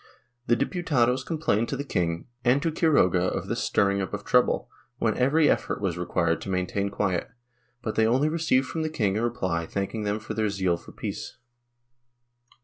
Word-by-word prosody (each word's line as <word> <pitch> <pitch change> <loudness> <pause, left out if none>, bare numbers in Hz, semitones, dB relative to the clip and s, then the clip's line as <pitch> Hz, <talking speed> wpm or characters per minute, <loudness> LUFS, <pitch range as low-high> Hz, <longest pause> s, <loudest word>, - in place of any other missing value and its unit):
The 120 - +4
Diputados 130 - +1
complained 120 -9 0
to 135 - -2
the 140 - -3
king 85 -10 -1 0.2
and 125 +3 +4
to 165 - +1
Quiroga 145 - +3
of 90 - -1
this - - -2
stirring 100 0 +2
up 95 - -3
of - - -7
trouble, - - +3 0.3
when - - +1
every 150 +4 +3
effort - - +1
was 95 -4 -1
required 90 0 0
to - - -6
maintain 95 +2 -1
quiet, 100 -3 -1 0.5
but 110 - -2
they 110 0 +3
only 130 +6 +3
received 155 -5 +2
from 160 - -4
the 155 - -1
king 105 -11 0
a 110 - 0
reply 95 -9 -1
thanking 100 +3 -3
them 105 0 -1
for 110 - -6
their 110 -1 0
zeal 95 -3 +1
for - - -12
peace. - - -6
110 Hz, 185 wpm, -26 LUFS, 95-135 Hz, 0.5 s, The